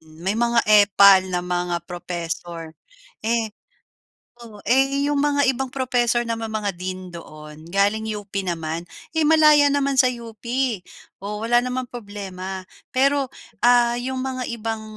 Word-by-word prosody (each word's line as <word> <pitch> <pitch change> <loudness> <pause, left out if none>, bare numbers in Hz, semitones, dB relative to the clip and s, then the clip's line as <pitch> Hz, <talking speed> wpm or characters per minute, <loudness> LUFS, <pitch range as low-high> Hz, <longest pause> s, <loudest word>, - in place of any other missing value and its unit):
May 160 +5 -5
mga 235 +1 +2 0.2
epal 195 -1 +6
na 180 -1 -2
mga 180 -1 -1
professor. 170 -2 -6 0.5
Eh, 225 -2 0 0.9
o, 215 -3 -12
eh 270 +3 +2
yung 290 -1 +1
mga 285 -1 +2
ibang 265 0 -4
professor 245 -3 +1
naman, 225 -1 -3
mga 205 -3 -2
dean 185 0 -6
doon, 155 -2 -11
galing 205 +3 +1
UP 205 -1 -10
naman. 165 -1 -3 0.3
Eh, 320 - +3
malaya 305 -2 +6
naman 280 -1 +1
sa 255 - +5
UP. 230 -3 -10 0.8
Oh, 210 +2 -5
wala 240 +1 +4
namang 250 0 -3
problema. 195 -4 -7 0.3
Pero, 275 +1 +2 0.3
ah, 240 -1 +5
yung 260 +1 -3
mga 255 -1 -3
ibang 225 -1 -4
220 Hz, 135 wpm, -22 LUFS, 185-255 Hz, 0.9 s, epal